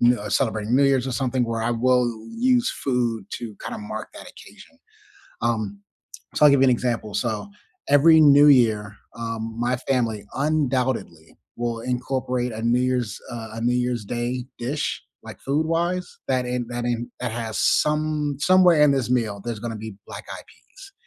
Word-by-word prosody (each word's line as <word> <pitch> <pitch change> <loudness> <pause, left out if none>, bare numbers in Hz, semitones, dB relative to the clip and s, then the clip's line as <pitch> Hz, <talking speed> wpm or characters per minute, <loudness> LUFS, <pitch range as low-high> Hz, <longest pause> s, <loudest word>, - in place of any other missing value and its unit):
you 120 +1 +5
know, 105 -3 -6
celebrating 110 0 0
New 140 - +5
Years, 135 -2 +2
or 130 - -3
something, 130 -1 0
where 115 -1 -3
I 115 +2 0
will 125 +1 +3 0.3
use 250 0 +3
food 120 -5 -1
to 115 -4 -6
kinda - - -6
mark 110 +1 -6
that - - -10
occasion. - - -16 0.6
Um, 110 -4 -1 0.6
so 150 - +5
I'll - - +9
give 140 - +4
you 135 - +6
an - - +5
example, 120 -3 -1
so, 110 - -2 0.4
every 160 +3 +6
New 145 0 +7
Year, 110 -7 +3 0.2
um, 115 -1 -4
my 120 +1 +1
family 120 -5 -1
undoubtedly 130 - -1 0.2
will 120 -1 -2
incorporate 125 0 -2
a 110 - -6
New 120 +2 +2
Year's, 125 -4 -1
uh 115 -2 -7
a - - -5
New 120 +1 +1
Year's 125 -3 -1
Day 120 +3 -3
dish, 135 +5 -3 0.2
like, - - -10
food-wise, 165 +5 0 0.2
that 130 -1 +1
in 125 -1 -2
that 120 0 -4
in 120 0 -2
that 125 -2 -3
has 115 -2 -4
some 150 -1 +1
somewhere 180 -1 +5
in 150 -1 +6
this 135 -4 0
meal 110 -5 0
there's 115 -3 -4
gonna 115 0 -5
be 110 -2 -8
black-eyed - - -8
peas, 390 +1 -17
125 Hz, 175 wpm, -23 LUFS, 115-135 Hz, 0.6 s, I'll